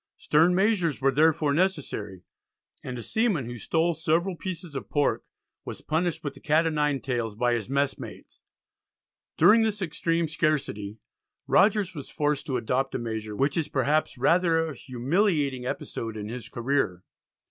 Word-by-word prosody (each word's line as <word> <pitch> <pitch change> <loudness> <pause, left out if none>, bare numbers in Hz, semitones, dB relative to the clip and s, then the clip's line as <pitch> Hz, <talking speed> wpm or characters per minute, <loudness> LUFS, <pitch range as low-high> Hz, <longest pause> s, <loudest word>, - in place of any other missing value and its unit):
Stern 165 +4 +3
measures 190 -6 +2
were 135 0 +3
therefore 150 +1 +3
necessary, 140 - -2 0.6
and 125 -1 -5
a 120 - -6
seaman 205 - 0
who 120 0 -7
stole 165 +8 +1
several 165 +3 0
pieces 175 -3 -6
of 135 - -5
pork 145 -1 +1 0.4
was - - -7
punished 165 +2 -1
with 145 - -3
the - - -14
cat 155 +2 +2
o' 165 - +1
nine 150 -3 0
tails 120 -5 -2
by 120 +2 +1
his 115 -2 -2
mess 140 0 0
mates. - - -11 1.0
During 225 +2 +6
this 220 -2 0
extreme 165 -2 -1
scarcity, 140 -10 -1 0.5
Rogers 200 -2 +3
was 145 -5 -8
forced 150 -2 -1
to 130 -3 0
adopt 130 +3 -1
a - - +1
measure 110 -3 -4
which 140 +5 +1
is 160 -3 0
perhaps 145 +1 0
rather 165 +4 +3
a - - -6
humiliating 140 - 0
episode 115 -3 -5
in 105 0 -5
his 120 0 -7
career. 120 -8 -1
145 Hz, 160 wpm, -26 LUFS, 125-165 Hz, 1.0 s, During